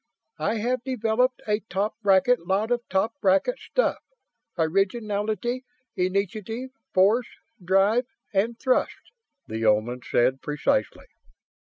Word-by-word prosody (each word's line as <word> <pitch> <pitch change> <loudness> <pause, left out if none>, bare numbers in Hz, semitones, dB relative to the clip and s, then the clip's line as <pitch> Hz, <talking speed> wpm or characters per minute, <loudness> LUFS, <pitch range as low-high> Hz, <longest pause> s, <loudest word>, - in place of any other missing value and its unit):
I 215 - 0
have 240 +3 -1
developed 250 0 0
a 210 0 +2
top 205 0 -2
bracket 195 0 +3
lot 205 +5 +1
of 240 0 +2
top 195 +4 +1
bracket 195 - +2
stuff - - 0 0.6
originality, 210 +7 0 0.3
initiative, 205 +7 -2 0.2
force, 210 +6 +3 0.4
drive 195 +7 +3 0.3
and 220 +4 +1
thrust," 260 -1 0 0.3
the 110 +1 -4
Oman 110 +3 +2
said 130 +2 +1
precisely. 145 -7 -1
210 Hz, 110 wpm, -25 LUFS, 185-240 Hz, 0.6 s, bracket